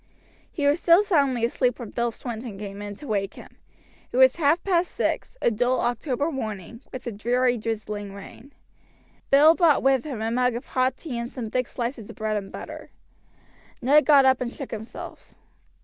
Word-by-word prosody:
He 290 - -2
was 290 +4 +3
still 345 +4 +5
soundly 280 - +2
asleep 250 +1 0
when 235 -4 -8
Bill 235 0 0
Swinton 230 -3 -7
came 200 0 -7
in 205 0 -6
to 290 - -11
wake 200 -3 -2
him. - - -14 0.5
It - - -3
was 260 +2 +6
half 320 +2 +2
past 355 -2 +1
six, - - -2
a - - +4
dull 245 +3 +1
October 255 +5 -1
morning, 220 - -6
with 255 - -8
a 240 - -3
dreary 245 +4 +1
drizzling 210 -2 -4
rain. 225 +7 -12 0.8
Bill 295 +4 +7
brought 335 -4 +3
with 270 -2 +3
him 275 -7 -5
a 220 +1 -2
mug 250 0 +1
of 240 - -5
hot 255 0 0
tea 260 -8 -5
and 235 0 -4
some 230 -4 -6
thick 250 -1 0
slices 235 -3 -5
of - - -9
bread 215 0 -2
and 200 -2 -4
butter. - - -8 0.9
Ned 290 +4 +4
got 285 -3 +7
up 260 -1 +4
and 240 -1 -2
shook 275 - -8
himself. 220 0 -9
245 Hz, 190 wpm, -25 LUFS, 225-280 Hz, 0.9 s, Bill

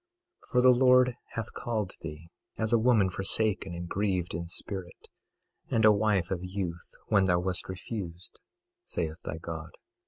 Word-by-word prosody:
22:6 - - -25
For 125 - +4
the 130 - +8
Lord 125 0 +5 0.2
hath 115 -2 -4
called 110 -5 -2
thee 80 +1 -8 0.3
as 110 +1 0
a 115 - +6
woman 110 -5 +4
forsaken 95 -1 0
and 85 0 -5
grieved 95 -2 -1
in 85 +1 -3
spirit, 90 0 -6 0.6
and 110 -1 +3
a 110 - +9
wife 100 -4 +2
of 95 - 0
youth, 90 -2 -4 0.2
when 100 -1 +4
thou 90 -1 +3
wast 90 +1 -1
refused, 95 -2 -6 0.4
saith 80 - -3
thy 80 - -4
God. 80 -1 -6
95 Hz, 160 wpm, -29 LUFS, 85-110 Hz, 0.6 s, a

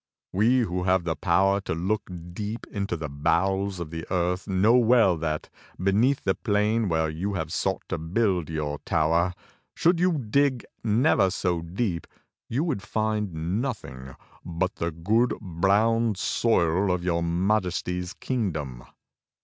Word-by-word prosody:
We 120 +6 +3
who 90 -4 -2
have 95 -1 +3
the 85 -2 -1
power 95 +6 +2
to 80 - -3
look 95 +6 -2 0.2
deep 105 +4 -5
into 100 -4 -2
the 80 -1 -4
bowels 95 +6 0
of 80 -3 -6
the 80 -1 -5
earth 90 +1 -1
know 100 +4 +4
well 115 -6 +5
that 80 -1 -3 0.3
beneath 105 +9 +2
the 95 - +2
plain 105 +1 +1
where 80 -1 +1
you 90 +6 -3
have 80 -2 -3
sought 95 0 -1
to 95 - -2
build 90 0 0
your 75 -2 -3
tower, 85 +3 +1 0.4
should 170 +1 +3
you 180 0 +3
dig 130 +1 +1 0.2
never 110 -2 +3
so 90 -2 -1
deep, 85 +1 -3 0.4
you 130 +7 0
would 150 - -1
find 100 -3 -1
nothing 65 - -6 0.3
but 90 +4 -2
the 85 - -1
good, 105 +10 +1
brown 105 +4 +2
soil 95 -2 +1
of 90 -1 -1
your 85 -2 0
Majesty's 90 0 -1
kingdom." 80 - -3
95 Hz, 145 wpm, -26 LUFS, 85-110 Hz, 0.4 s, well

